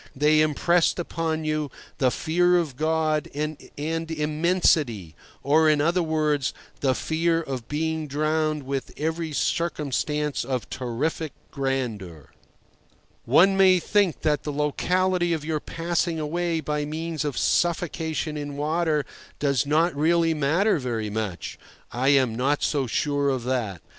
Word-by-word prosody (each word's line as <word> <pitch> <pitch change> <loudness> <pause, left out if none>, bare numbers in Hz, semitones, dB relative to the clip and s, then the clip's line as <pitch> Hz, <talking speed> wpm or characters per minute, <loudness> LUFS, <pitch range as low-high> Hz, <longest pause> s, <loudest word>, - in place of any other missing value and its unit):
They 150 +2 +4
impressed 165 +3 +2
upon 165 -2 -2
you 155 -1 -1 0.3
the 130 - +4
fear 175 +6 +2
of 160 -7 -1
God 155 0 0
and 155 +1 -2 0.2
Immensity—or, 155 - 0
in 150 -1 +3
other 170 +5 +2
words, 155 -4 0 0.2
the 130 -2 +1
fear 165 +3 0
of 130 -7 -5
being 160 +1 -2
drowned 155 +1 0
with 135 0 -4
every 160 +1 -2
circumstance 150 -2 -1
of 130 -3 -3
terrific 140 +5 -3 0.2
grandeur. 115 - -3 0.9
One 180 +10 +5
may 190 -1 +6
think 190 -1 +1
that 150 -2 +1
the 150 - -4
locality 175 +5 +1
of 155 -2 -3
your 155 -1 -1
passing 170 +1 -2
away 165 +2 -1
by 150 -1 -2
means 160 0 -3
of 145 -3 -3
suffocation 160 -2 0
in 145 -1 -5
water 155 -1 0 0.3
does 140 -3 +1
not 160 +3 +2
really 165 +2 +3
matter 160 +6 +2
very 115 -5 -3
much. 105 -4 -4 0.3
I 125 +3 -1
am 135 -4 +4
not 135 +5 0
so 140 -4 0
sure 145 +4 0
of 130 -3 -1
that. 115 -8 -2
155 Hz, 135 wpm, -25 LUFS, 140-165 Hz, 0.9 s, may